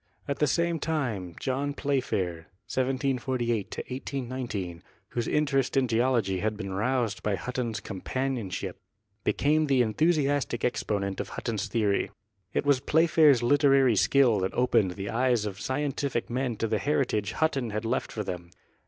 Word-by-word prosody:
At 140 - -2
the 150 - +3
same 170 +2 +1
time 115 - -2
John 140 +2 -1
Playfair 95 - -1 0.2
(1748 130 -4 0
1819), 125 -9 -4 0.3
whose 120 -1 -2
interest 140 -3 +1
in 130 -1 +3
geology 115 -5 +1
had 110 +2 -1
been 100 -3 -5
roused 115 0 0
by 105 -2 0
Hutton's 120 -1 -3
compan 130 +8 -3
ionship, 100 -7 -4 0.5
became 150 +8 +2
the 135 -3 +4
enthusiastic 145 0 +1
exponent 100 -5 -1
of - - -3
Hutton's 110 -5 -3
theory. 105 -4 +1 0.4
It - - -1
was 145 -2 +4
Playfair's 155 -4 +4
literary 135 -2 +4
skill 120 0 +4
that 95 0 -2
opened 105 -7 +2
the 100 0 -4
eyes 120 -2 +2
of 100 -1 -5
scientific 135 -3 -2
men 125 -1 -1
to 115 - -1
the 110 -1 0
heritage 125 -8 0
Hutton 140 -7 0
had 110 +1 -3
left 120 +3 -1
for 105 - -3
them. 90 -3 -6
125 Hz, 145 wpm, -28 LUFS, 105-135 Hz, 0.5 s, the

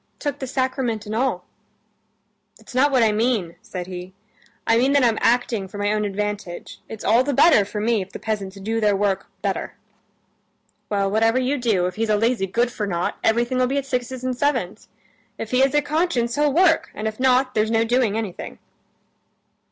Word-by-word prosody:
"Took 290 -1 -3
the 265 - -4
sacrament 255 -4 -1
and 210 - -5
all." 225 -6 -1 1.1
"That's - - -15
not 275 +3 +3
what 255 -3 +4
I 220 - +4
mean," 210 -6 0
said 180 -1 -6
he. 180 0 -8 0.5
"I 225 - +3
mean 260 +4 +3
that 285 -2 +4
I'm 230 -3 +2
acting 235 -4 +1
for 200 - -10
my 205 +1 0
own 210 0 0
advantage. 205 -3 -4
It's 220 - -8
all 235 +3 +4
the 280 0 -1
better 315 -10 +6
for 210 +1 -5
me 220 0 +1
if 190 +1 -8
the - - -7
peasants 200 -3 -4
do 225 +3 -2
their 210 -1 +3
work 195 -1 0 0.2
better." - - -2 1.1
"Well, 200 -1 0
whatever 225 +3 +3
you 260 +3 0
do, 215 -7 +1
if 180 +1 -4
he's 225 0 -1
a 210 - +3
lazy 225 -2 +1
good 235 +5 0
for 210 -2 -3
nought, 175 -2 -2
everything'll 240 +3 +2
be 275 +2 -1
at 280 - -1
sixes 255 -1 -3
and 255 -1 -1
sevens. 250 -9 -1 0.5
If 225 - -6
he 250 - +2
has 270 +1 +3
a 295 - +3
conscience, 290 -6 0
he'll 295 +1 +2
work, 325 +2 +3
and 215 - -3
if 220 +1 -5
not, 255 0 +3
there's 215 0 +1
no 225 0 +2
doing 230 -2 +1
anything." 215 -5 -5
225 Hz, 200 wpm, -22 LUFS, 205-255 Hz, 1.1 s, better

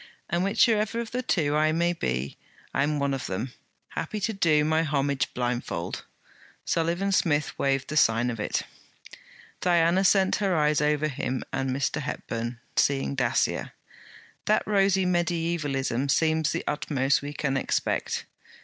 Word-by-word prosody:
'And 175 +2 +1
whichever 215 +2 +2
of 235 -1 -4
the 250 - -1
two 150 -11 +1
I 155 +1 +3
may 170 +2 +1
be, 65 - -2 0.4
I'm 145 +2 +1
one 140 -1 0
of 135 - -3
them, 115 +7 -4 0.4
happy 215 - -4
to 225 - 0
do 155 -6 +3
my 160 +1 +2
homage 140 -3 0
blindfold!' 120 -8 -3 0.6
Sullivan 170 +4 0
Smith 155 -6 +1
waved 135 -1 +1
the 155 - -5
sign 120 -3 +3
of 115 - -6
it. 105 - -1 1.0
Diana 175 +1 +3
sent 190 0 +4
her 195 -4 +1
eyes 150 -1 +2
over 150 0 +2
him 130 -2 -3
and 135 0 -1
Mr. 140 +3 -1
Hepburn, 120 -2 -4 0.2
seeing 140 0 +2
Dacier. 125 -4 0 0.7
'That 215 - +2
rosy 195 -2 +3
mediaevalism 165 -7 0
seems 160 +1 +2
the - - -2
utmost 140 -2 0
we 145 +1 -5
can 140 -2 -2
expect.' 135 - -1
150 Hz, 145 wpm, -26 LUFS, 135-175 Hz, 1.0 s, sent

